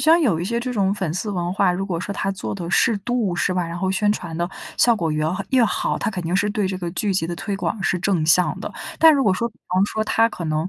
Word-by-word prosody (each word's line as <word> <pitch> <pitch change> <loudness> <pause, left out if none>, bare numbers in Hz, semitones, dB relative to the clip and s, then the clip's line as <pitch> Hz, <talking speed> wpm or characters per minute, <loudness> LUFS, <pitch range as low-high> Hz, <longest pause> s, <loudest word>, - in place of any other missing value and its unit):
像 330 +2 +5
有 200 - +2
一 175 - -2
些 235 +4 -1
这 250 +1 -3
种 195 -3 +1
粉 190 -6 -3
丝 205 +4 -3
文 175 -2 -2
化， 195 -3 +3
如 195 +2 -3
果 170 -3 -2
说 200 - -4
它 195 - -2
做 185 - -5
得 175 -4 -5
适 215 +1 +3
度 215 -4 -1
是 185 - 0
吧， 180 -1 0
然 170 +1 -5
后 190 +1 -1
宣 205 +2 +1
传 170 -5 -6
的 175 +1 -2 0.3
效 235 -2 +4
果 165 -5 -1
越 155 0 0 0.3
越 255 -3 +4
好， 220 - -1
它 - - -1
肯 185 - -4
定 170 +2 -1
是 205 +2 +2
对 205 -1 0
这 190 0 -2
个 175 -2 -4
剧 195 +2 -1
集 180 - +1
的 170 +1 -4
推 205 - -3
广 210 +1 -3
是 185 - +1
正 175 -4 +1
向 175 +3 +3
的。 - - -6 0.3
但 320 -1 +7
如 275 - +2
果 195 - +3
说 235 +5 -1
比 215 - -24
方 185 +2 +2
说 215 - -2
它 225 +1 +3
可 175 -6 -7
能 155 +3 -1
190 Hz, 315 characters per minute, -22 LUFS, 175-215 Hz, 0.3 s, 但